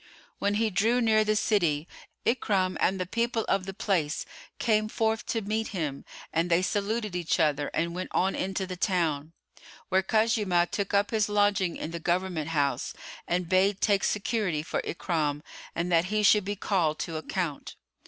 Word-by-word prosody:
When 205 Hz, 0 st, +1 dB
he 220 Hz, 0 st, +1 dB
drew 225 Hz, +7 st, +2 dB
near 220 Hz, -2 st, +4 dB
the 215 Hz, 0 st, +1 dB
city, 170 Hz, -8 st, +1 dB, 0.4 s
Ikrimah 195 Hz, -6 st, +1 dB
and 190 Hz, 0 st, +2 dB
the 185 Hz, -, -1 dB
people 230 Hz, +3 st, -1 dB
of 195 Hz, -1 st, 0 dB
the 195 Hz, -, -4 dB
place 175 Hz, -8 st, 0 dB, 0.3 s
came 215 Hz, -2 st, +1 dB
forth 220 Hz, 0 st, 0 dB
to 225 Hz, -2 st, -1 dB
meet 220 Hz, +2 st, -1 dB
him 145 Hz, -5 st, -3 dB, 0.3 s
and 165 Hz, +2 st, +1 dB
they 170 Hz, +1 st, +3 dB
saluted 205 Hz, +1 st, -1 dB
each 175 Hz, 0 st, 0 dB
other 150 Hz, -2 st, +2 dB
and 170 Hz, +2 st, -1 dB
went 185 Hz, +1 st, -4 dB
on 190 Hz, +1 st, +1 dB
into 190 Hz, 0 st, -2 dB
the 185 Hz, 0 st, -6 dB
town, 165 Hz, -5 st, 0 dB, 0.6 s
where 190 Hz, +1 st, +3 dB
Khuzaymah 210 Hz, -4 st, +2 dB
took 200 Hz, 0 st, -1 dB
up 200 Hz, +1 st, +2 dB
his 215 Hz, -2 st, +1 dB
lodging 205 Hz, -3 st, +2 dB
in 160 Hz, -, -5 dB
the 170 Hz, -, -4 dB
Government 175 Hz, -2 st, -1 dB
house 145 Hz, -3 st, 0 dB, 0.3 s
and 175 Hz, 0 st, 0 dB
bade 190 Hz, +2 st, +3 dB
take 200 Hz, -2 st, +2 dB
security 200 Hz, -7 st, 0 dB
for 155 Hz, -, -2 dB
Ikrimah 150 Hz, -4 st, -2 dB, 0.3 s
and 175 Hz, +2 st, -1 dB
that 170 Hz, 0 st, +4 dB
he 210 Hz, +2 st, 0 dB
should 210 Hz, -1 st, +5 dB
be 205 Hz, +1 st, -2 dB
called 175 Hz, -6 st, 0 dB
to 165 Hz, -2 st, -3 dB
account. 160 Hz, -1 st, -4 dB
190 Hz, 175 wpm, -28 LUFS, 170-210 Hz, 0.6 s, should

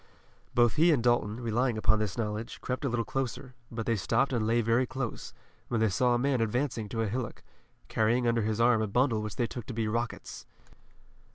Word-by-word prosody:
Both 120 Hz, +3 st, +4 dB
he 165 Hz, +3 st, +6 dB
and 135 Hz, -7 st, +2 dB
Dalton, 120 Hz, -2 st, +1 dB
relying 120 Hz, 0 st, 0 dB
upon 110 Hz, 0 st, +2 dB
this 105 Hz, -1 st, -2 dB
knowledge, 110 Hz, 0 st, -3 dB
crept 130 Hz, +3 st, -3 dB
a -, -, +1 dB
little 115 Hz, -1 st, -1 dB
closer, 130 Hz, -1 st, -3 dB, 0.2 s
but 115 Hz, -1 st, -4 dB
they 115 Hz, -, +1 dB
stopped 135 Hz, +7 st, +1 dB
and 110 Hz, -3 st, 0 dB
lay 115 Hz, +1 st, +3 dB
very 115 Hz, +3 st, +2 dB
close, 130 Hz, -2 st, -5 dB, 0.4 s
when 120 Hz, -, -1 dB
they 110 Hz, -1 st, +3 dB
saw 120 Hz, +5 st, +2 dB
a -, -, +3 dB
man 130 Hz, -1 st, +1 dB
advancing 115 Hz, -1 st, -1 dB
to 115 Hz, +1 st, -1 dB
a -, -, -1 dB
hillock, 115 Hz, +2 st, -4 dB, 0.4 s
carrying 120 Hz, +3 st, +1 dB
under 115 Hz, -1 st, +2 dB
his 110 Hz, +1 st, -1 dB
arm 120 Hz, -1 st, +4 dB
a 110 Hz, -, 0 dB
bundle 115 Hz, +1 st, +2 dB
which 105 Hz, -2 st, -5 dB
they 120 Hz, -, +1 dB
took 120 Hz, -1 st, -7 dB
to 125 Hz, -, -6 dB
be 115 Hz, -1 st, 0 dB
rockets. 115 Hz, +2 st, -4 dB
115 Hz, 210 wpm, -29 LUFS, 110-125 Hz, 0.4 s, he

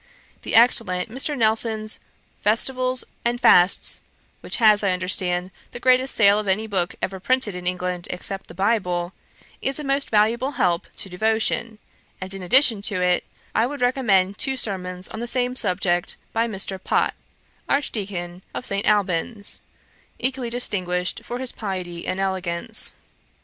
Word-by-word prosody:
The -, -, -2 dB
excellent 225 Hz, -5 st, +4 dB
Mr. 275 Hz, +4 st, 0 dB
Nelson's 220 Hz, -1 st, +1 dB, 0.4 s
Festivals 255 Hz, +4 st, +1 dB, 0.2 s
and 240 Hz, +1 st, 0 dB
Fasts, 180 Hz, -3 st, +5 dB, 0.4 s
which -, -, -3 dB
has, 215 Hz, -3 st, +5 dB
I 195 Hz, -2 st, +2 dB
understand, 180 Hz, 0 st, 0 dB, 0.2 s
the -, -, -6 dB
greatest 255 Hz, +1 st, +3 dB
sale 205 Hz, -1 st, +5 dB
of 210 Hz, -, -4 dB
any 200 Hz, +3 st, +1 dB
book 190 Hz, -5 st, -2 dB
ever 190 Hz, 0 st, -2 dB
printed 255 Hz, 0 st, +1 dB
in 180 Hz, 0 st, -6 dB
England, 180 Hz, -1 st, -2 dB
except 195 Hz, +2 st, -4 dB
the 170 Hz, -, -12 dB
Bible, 185 Hz, -3 st, 0 dB, 0.5 s
is 270 Hz, -, 0 dB
a 300 Hz, -, -4 dB
most 275 Hz, 0 st, +1 dB
valuable 230 Hz, +6 st, +2 dB
help 175 Hz, -6 st, +1 dB
to -, -, -6 dB
devotion; 220 Hz, +3 st, 0 dB, 0.4 s
and 190 Hz, +1 st, -5 dB
in 195 Hz, -, -6 dB
addition 230 Hz, +2 st, +4 dB
to 205 Hz, -2 st, 0 dB
it 180 Hz, 0 st, +2 dB, 0.3 s
I 225 Hz, +2 st, +2 dB
would 285 Hz, 0 st, -6 dB
recommend 205 Hz, -7 st, +2 dB
two 265 Hz, -1 st, 0 dB
sermons 180 Hz, -5 st, 0 dB
on -, -, -8 dB
the 240 Hz, -, -4 dB
same 250 Hz, +1 st, 0 dB
subject, 180 Hz, -5 st, 0 dB, 0.2 s
by 230 Hz, +1 st, +1 dB
Mr. 195 Hz, -3 st, -4 dB
Pott, -, -, +1 dB, 0.6 s
Archdeacon 190 Hz, -10 st, -2 dB
of -, -, -4 dB
St. 200 Hz, 0 st, -1 dB
Alban's, 205 Hz, +1 st, 0 dB, 0.6 s
equally 260 Hz, -1 st, -2 dB
distinguished 185 Hz, -7 st, -1 dB
for 245 Hz, +2 st, -5 dB
piety 185 Hz, -5 st, -5 dB
and 185 Hz, -, -2 dB
elegance. 190 Hz, +2 st, -2 dB
205 Hz, 150 wpm, -23 LUFS, 180-240 Hz, 0.6 s, Fasts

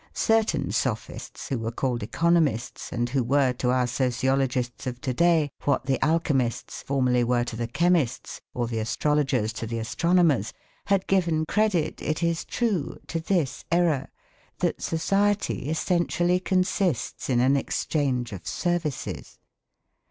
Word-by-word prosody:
Certain 225 Hz, -1 st, +2 dB
sophists, -, -, -3 dB
who 135 Hz, -4 st, -1 dB
were 115 Hz, 0 st, -3 dB
called 120 Hz, 0 st, -1 dB
economists, 160 Hz, -1 st, 0 dB
and 120 Hz, 0 st, -1 dB
who 130 Hz, 0 st, +1 dB
were 135 Hz, +1 st, +2 dB
to 125 Hz, 0 st, -1 dB
our 125 Hz, 0 st, +2 dB
sociologists 130 Hz, 0 st, 0 dB
of 125 Hz, -1 st, -4 dB
to 130 Hz, 0 st, -2 dB
day 165 Hz, -1 st, +3 dB
what 140 Hz, -3 st, +1 dB
the 135 Hz, -1 st, 0 dB
alchemists 145 Hz, -7 st, 0 dB
formerly 125 Hz, -3 st, +1 dB
were 120 Hz, 0 st, +2 dB
to 120 Hz, -, -5 dB
the 120 Hz, +1 st, -3 dB
chemists 170 Hz, 0 st, 0 dB
or 120 Hz, -, 0 dB
the 115 Hz, -1 st, -3 dB
astrologers 130 Hz, -1 st, 0 dB
to 115 Hz, 0 st, -5 dB
the 115 Hz, +1 st, -3 dB
astronomers, 160 Hz, -, +2 dB, 0.3 s
had 195 Hz, -1 st, +2 dB
given 170 Hz, -5 st, +1 dB
credit, 185 Hz, -5 st, 0 dB
it 155 Hz, +2 st, -2 dB
is 170 Hz, 0 st, 0 dB
true, 210 Hz, -, -1 dB
to 165 Hz, -, -3 dB
this 165 Hz, -5 st, -1 dB
error 165 Hz, -6 st, +2 dB, 0.5 s
that -, -, -1 dB
society 195 Hz, -2 st, 0 dB
essentially 175 Hz, +2 st, +1 dB
consists 185 Hz, -, 0 dB
in 125 Hz, -2 st, +3 dB
an 130 Hz, +3 st, +4 dB
exchange 135 Hz, -3 st, -1 dB
of 90 Hz, -5 st, -8 dB
services. 160 Hz, -, -3 dB
140 Hz, 140 wpm, -26 LUFS, 125-170 Hz, 0.5 s, an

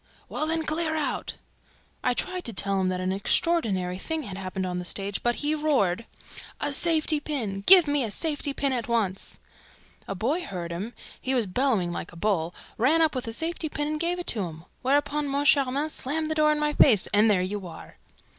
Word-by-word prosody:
'Well, 310 Hz, -, -2 dB
then, 325 Hz, 0 st, 0 dB
clear 315 Hz, +1 st, -1 dB
out!' 305 Hz, -2 st, -2 dB, 0.7 s
I 250 Hz, -, +1 dB
tried 365 Hz, +5 st, -3 dB
to 230 Hz, -, -3 dB
tell 195 Hz, 0 st, 0 dB
him 185 Hz, -, +1 dB
that 185 Hz, 0 st, -2 dB
an 185 Hz, 0 st, -1 dB
unheard 330 Hz, -, +1 dB
of 185 Hz, -2 st, -2 dB
thing 320 Hz, -1 st, -2 dB
had 200 Hz, -6 st, -7 dB
happened 190 Hz, 0 st, -4 dB
on 180 Hz, -1 st, -3 dB
the -, -, -4 dB
stage, 200 Hz, +3 st, -2 dB
but 240 Hz, 0 st, +1 dB
he 295 Hz, +1 st, -1 dB
roared, 260 Hz, -, +1 dB, 0.5 s
'A 290 Hz, -, -1 dB
safety 315 Hz, -1 st, +2 dB
pin! 225 Hz, -10 st, -4 dB
Give 365 Hz, -5 st, +9 dB
me 290 Hz, -2 st, +2 dB
a 225 Hz, -, -2 dB
safety 290 Hz, -, -1 dB
pin 275 Hz, -1 st, 0 dB
at 240 Hz, -3 st, -2 dB
once!' 210 Hz, -5 st, -1 dB, 0.7 s
A 195 Hz, -, -4 dB
boy 265 Hz, -, 0 dB
heard 175 Hz, -, -5 dB
him 200 Hz, +8 st, -5 dB, 0.3 s
he 260 Hz, +1 st, 0 dB
was 240 Hz, -3 st, +2 dB
bellowing 200 Hz, -3 st, 0 dB
like 170 Hz, -, -5 dB
a -, -, -15 dB
bull 175 Hz, -3 st, 0 dB, 0.2 s
ran 280 Hz, +8 st, +4 dB
up 320 Hz, -2 st, +3 dB
with 255 Hz, -2 st, -4 dB
a -, -, -3 dB
safety 325 Hz, +5 st, -2 dB
pin 295 Hz, 0 st, -2 dB
and 305 Hz, 0 st, -2 dB
gave 345 Hz, +2 st, 0 dB
it 355 Hz, -, -5 dB
to 220 Hz, -, +1 dB
him; 160 Hz, 0 st, -9 dB, 0.2 s
whereupon 285 Hz, +2 st, +1 dB
Moncharmin 280 Hz, +1 st, +2 dB
slammed 310 Hz, +4 st, -2 dB
the -, -, +2 dB
door 305 Hz, -1 st, +3 dB
in 300 Hz, -, +1 dB
my 300 Hz, 0 st, 0 dB
face, 220 Hz, -10 st, +5 dB
and 210 Hz, +2 st, +5 dB
there 190 Hz, -3 st, +3 dB
you 195 Hz, 0 st, -4 dB
are!" 165 Hz, -, -12 dB
255 Hz, 210 wpm, -26 LUFS, 195-305 Hz, 0.7 s, Give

